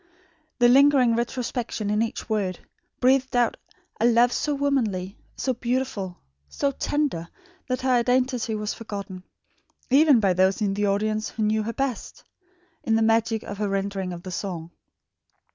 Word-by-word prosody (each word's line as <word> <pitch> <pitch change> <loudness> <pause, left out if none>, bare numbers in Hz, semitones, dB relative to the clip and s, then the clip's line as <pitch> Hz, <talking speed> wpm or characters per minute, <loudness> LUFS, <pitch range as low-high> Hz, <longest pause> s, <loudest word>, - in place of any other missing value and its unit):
The 240 -1 +5
lingering 265 -2 +5
retrospection 235 -3 -2
in 210 +1 +1
each 230 - -3
word; 200 -5 -1 0.4
breathed 260 0 +2
out 240 -2 +2 0.4
a 225 - +2
love 240 +1 +4
so 295 -1 -1
womanly, 225 -10 -1 0.2
so 260 - -1
beautiful, 240 -7 -3 0.3
so 280 - -1
tender, 275 - -2 0.4
that 255 -1 -2
her 260 0 +1
identity 250 -1 +1
was 210 0 -3
forgotten 200 -4 -7 0.7
even 285 -2 +6
by 195 -4 +2
those 190 +3 +2
in 205 -3 0
the 205 +1 0
audience 215 +2 0
who 220 - -3
knew 215 +1 +1
her 225 +2 -4
best 270 -2 -4 0.6
in 225 - +1
the 225 - +3
magic 225 0 +2
of 205 - -7
her 210 -1 0
rendering 195 -1 -2
of 175 0 -8
the 185 - -7
song. 175 -3 -5
225 Hz, 155 wpm, -25 LUFS, 200-255 Hz, 0.7 s, even